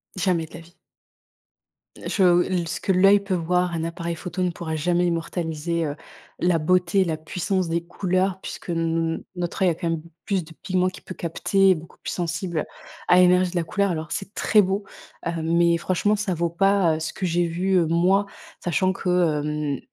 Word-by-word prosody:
Jamais 180 -3 0
de - - -18
la - - -8
vie. 170 +1 -20 1.3
Je, 200 - -1
heu, 175 0 +3
ce - - -3
que - - 0
l'oeil 195 +2 +6
peut 200 -1 -3
voir, 180 +1 +1
un 165 -1 -2
appareil 170 0 -3
photo 180 +2 -4
ne 180 - +1
pourra 160 -2 -5
jamais 175 +3 +1
immortaliser, 165 -1 -2
heu, 145 0 -3 0.4
la 175 -2 +2
beauté, 185 +4 +2
la 165 -3 -2
puissance 180 +3 -2
des 170 +1 -1
couleurs 185 +1 -1
puisque - - -8
n 165 -1 -1
notre 175 +1 -2
oeil 185 - +5
a - - -3
quand 170 +1 -3
même 165 -1 -2 0.2
plus 195 -4 0
de 160 +1 -14
pigments 185 -1 +1
qui 185 - -12
peut 185 - -9
capter 190 +3 +2
et - - +4
beaucoup 160 0 -11
plus - - -6
sensible 170 -1 -2 0.4
à - - +6
l'énergie 180 0 +5
de - - -10
la 175 - +1
couleur 200 +4 0
alors 160 -3 -4
c'est 195 +1 -5
très 210 -2 +4
beau, 195 +2 -1 0.4
heu, 170 - 0
mais 170 +1 +3
franchement 185 +4 +1
ça 205 -4 -2
vaut 170 +1 0
pas, 195 -2 +3
heu, - - -4
ce 160 - -3
que 190 - -4
j'ai 175 0 +1
vu, 180 +3 -1
heu, 170 -3 +3
moi 185 +5 +3 0.4
sachant 185 +2 +1
que, 185 - -4
hem, 150 -4 0
heu, - - -13
175 Hz, 205 wpm, -24 LUFS, 165-185 Hz, 1.3 s, l'oeil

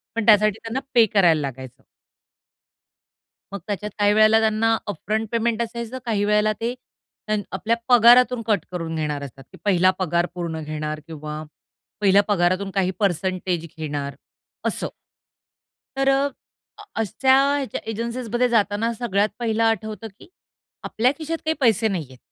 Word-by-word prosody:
पण 230 - -1
त्यासाठी 215 0 +5
त्यांना 225 +4 -3
पे 235 -2 +6
करायला 170 -6 +4
लागायचं. 130 -2 -7 1.7
मग 200 - -4
त्याच्यात 210 +1 -3
काही 205 0 +4
वेळेला 215 +1 +5
त्यांना 225 +1 +2
अपफ्रंट 215 +4 -2
पेमेंट 230 0 0
असायचं 235 +1 -5
काही 210 -3 0
वेळेला 210 +1 +2
ते 235 +2 -1 0.5
त्यान 215 -1 0
आपल्या 230 +2 0
पगारातून 245 0 +6
कट 205 -6 +1
करून 165 -2 -4
घेणार 150 -2 -2
असतात 135 0 -10
की - - -14
पहिला 185 -2 +4
पगार 175 -1 +1
पूर्ण 170 -3 -4
घेणार 155 0 -4
किंवा 155 -1 -7 0.6
पहिल्या 200 0 +5
पगारातून 185 0 +1
काही 190 -1 +1
पर्सेंटेज 185 -2 -1
घेणार 145 -3 -4 0.5
असं. - - -2 1.1
तर 270 0 +1
अ, 275 +1 +2 0.5
अ - - -10 0.2
अशा 260 +5 +3 0.2
ह्याच्या 275 -6 -3
एजन्सीजमध्ये 235 +2 -1
जाताना 225 0 +1
सगळ्यात 210 -3 0
पहिलं 225 -1 0
आठवतं 220 0 -1
की - - -15 0.6
आपल्या 245 +4 +1
खिशात 325 +1 -3
काही 315 - +2
पैसे 225 -3 +3
नाहीयेत. 155 -10 -4
210 Hz, 140 wpm, -22 LUFS, 175-230 Hz, 1.7 s, पे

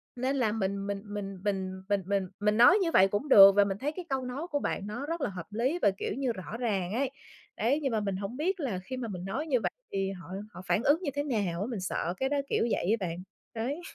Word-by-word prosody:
nên 260 +3 -1
là 245 -6 +2
mình 200 -2 -2
mình 200 -1 -3
mình 205 -2 -5
mình 190 -2 -2
mình 200 -1 +2
mình 195 -1 0
mình 210 +1 +2
nói 245 - +8
như 340 -3 +1
vậy 190 -10 +6
cũng 205 +9 -2
được 195 -4 +10
và 205 - +6
mình 195 -1 -2
thấy 280 +7 -2
cái 355 +3 -7
câu 270 -1 0
nói 270 +7 -4
của 290 -4 -1
bạn 200 -7 -2
nó 240 +7 -4
rất 330 +2 -3
là - - 0
hợp 180 -3 -7
lý 250 +11 0
và, 200 - +5
kiểu - - -2
như, 265 -1 -1
rõ 210 +1 -6
ràng 200 -6 -1
ấy. 265 +3 0 0.5
Đấy, 265 +6 +2
nhưng 270 -3 0
mà 220 - +1
mình 200 -2 -2
hổng 200 +6 -5
biết 360 +5 0
là 240 - -2
khi 255 +6 -6
mà 245 -2 -3
mình 185 -4 -6
nói 265 +11 -3
như 260 -5 +2
vậy - - -1 0.2
thì 195 0 -1
họ 180 -4 -9 0.3
họ - - -8
phản 220 - +2
ứng 300 +5 +4
như 305 -6 -2
thế 285 +1 -1
nào 200 - -1
á. 205 - -1
Mình 230 -5 -3
sợ 180 -2 -2
cái 265 +4 0
đó 290 - +1
kiểu - - +2
vậy 205 +5 +2
á 190 - -2
bạn, 165 0 -4 0.4
đấy. 260 +9 -2
215 Hz, 275 wpm, -29 LUFS, 195-270 Hz, 0.5 s, được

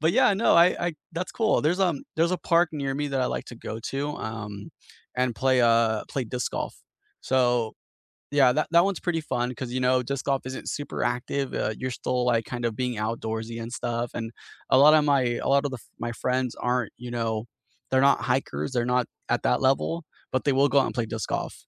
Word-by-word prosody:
but, 160 +3 +3
yeah, 200 - +5
no, 225 - +3
I 170 +1 +8 0.2
I 175 - 0 0.2
that's 180 +2 -4
cool. 220 -2 +2
There's, 175 +5 +1
um 175 -7 +2 0.2
there's 170 +3 +2
a 185 - 0
park 170 -1 +3
near 140 -3 -2
me 145 +1 -2
that 135 -2 -1
I 125 - +2
like - - -3
to 120 - -9
go 110 -1 -6
to, 140 +2 -2
um, 105 -2 -6 0.5
and 125 -2 +1
play, 130 +3 +2
uh 115 -2 +3
play 135 - -1
disc 125 +2 -3
golf. - - -3 0.6
So 120 -3 +2 0.6
Yeah, 130 -3 +6
that 155 - +1
that 170 +2 +7
one's 195 -4 -2
pretty 165 -2 +1
fun 120 0 +1
'cause, 125 -1 -6
you - - 0
know, 130 0 +3
disc 135 +2 -4
golf 135 -1 +1
isn't 130 0 -5
super 145 -1 -5
active, 130 +2 -1
uh, - - 0
you're 130 0 -3
still, 125 -1 0
like, 115 -2 +2
kind 120 -1 -5
of 115 - -2
being 125 -1 -1
outdoorsy 110 +1 -3
and 115 - -6
stuff, 120 -1 -2
and 115 -1 -4 0.4
a 130 - +6
lot 150 +3 +8
of 155 -1 +5
my 140 -2 +3 0.2
a - - +1
lot 140 +1 +4
of 140 - -3
the 130 - -5
f - - -23 0.2
my 120 - -2
friends 125 -1 0
aren't, 125 -2 -1
you 125 0 -7
know, 115 -2 -2 0.5
they're 130 - +4
not - - +1
hikers, 135 0 -2
they're 120 -2 0
not 125 -1 +2 0.2
at - - +1
that - - +2
level, 165 +4 0 0.3
but 130 - 0
they 140 - +3
will 140 +1 +5
go 140 - +4
out - - +2
and - - -6
play 115 - +1
disc 110 - -4
golf. - - -2
130 Hz, 235 wpm, -26 LUFS, 120-145 Hz, 0.6 s, I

